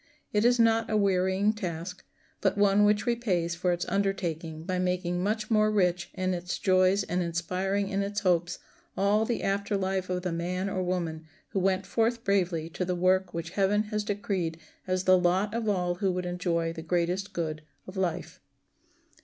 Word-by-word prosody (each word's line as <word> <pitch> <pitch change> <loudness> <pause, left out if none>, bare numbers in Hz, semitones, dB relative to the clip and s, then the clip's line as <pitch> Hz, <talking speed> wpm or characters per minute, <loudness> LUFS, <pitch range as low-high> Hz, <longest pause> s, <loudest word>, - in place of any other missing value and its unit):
It 210 +2 +2
is 245 +1 +5
not 225 0 +3
a 215 - +2
wearying 195 +1 +2
task, 180 -3 -5 0.4
but - - +1
one 205 0 +4
which 210 0 +2
repays 195 -8 0
for 175 +1 0
its 175 0 -1
undertaking 170 -5 -2
by 185 +2 -2
making 180 -1 -1
much 215 +3 -1
more 215 -1 +4
rich 180 -4 +1
in 185 0 0
its 175 0 -3
joys 185 +1 +3
and 180 0 -1
inspiring 180 +4 -1
in 200 0 0
its 200 +1 -2
hopes 175 -3 +1 0.4
all 205 +3 +3
the 235 0 -2
after 200 +1 0
life 190 -1 -1
of 180 -1 -2
the 180 - -1
man 180 +3 -2
or 185 - -1
woman 170 -3 -2 0.2
who 195 - -1
went 190 0 +1
forth 230 +3 0
bravely 180 -6 +1
to 155 - -3
the 180 0 -1
work 185 +1 +2
which 170 0 -4
heaven 205 +2 +2
has 210 0 0
decreed 200 -6 -2 0.3
as 185 0 0
the 185 -1 +5
lot 185 +4 +1
of 230 -2 -1
all 180 -3 +1
who 190 +1 0
would 180 0 -3
enjoy 170 -2 -1
the 160 - -7
greatest 175 +4 -1
good 155 -3 -3 0.2
of 185 - -10
life. 180 -2 -2
185 Hz, 185 wpm, -28 LUFS, 175-200 Hz, 0.4 s, is